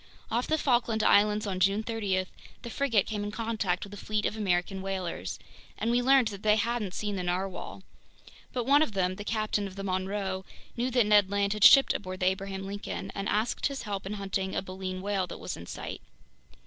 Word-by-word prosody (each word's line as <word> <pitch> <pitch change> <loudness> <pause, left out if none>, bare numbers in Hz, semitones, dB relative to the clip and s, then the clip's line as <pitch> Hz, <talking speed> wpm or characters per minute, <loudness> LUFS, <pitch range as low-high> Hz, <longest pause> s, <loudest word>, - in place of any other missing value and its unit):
Off 240 +2 0
the 315 - +2
Falkland 240 -6 +1
Islands 210 +1 +4
on 190 -2 -2
June 195 +3 +3
30, 205 -5 -1 0.4
the 235 - -6
frigate 235 -8 +2
came 210 -2 -3
in 205 - -3
contact 215 -5 -1
with 200 - -9
a - - -7
fleet 210 +1 -2
of - - -1
American 190 -2 0
whalers, 185 - -4 0.4
and 225 +2 0
we 245 +1 +3
learned 260 -2 +5
that 200 -2 -8
they 210 0 +4
hadn't 220 -3 -1
seen 205 -2 -2
the - - -2
narwhale. 185 +2 -3 0.7
But 245 -2 -2
one 285 +2 +5
of 270 -9 +1
them, 185 -1 0
the 205 - -5
captain 215 -2 -1
of 190 - -11
the 195 - -6
Monroe, 190 0 -2 0.3
knew 245 +2 0
that 245 -3 +3
Ned 205 -2 +5
Land 200 0 +1
had 210 -1 -2
shipped 275 -1 +8
aboard 185 -2 -5
the - - +2
Abraham 190 +1 -1
Lincoln 200 +1 -5
and 195 -1 -3
asked 215 +3 +1
his 275 -1 -5
help 200 -2 -4
in 200 - -3
hunting 195 -1 -3
a - - -1
baleen 185 0 -5
whale 195 -2 0
that - - -7
was - - -4
in - - -10
sight. - - -6
205 Hz, 210 wpm, -29 LUFS, 190-220 Hz, 0.7 s, shipped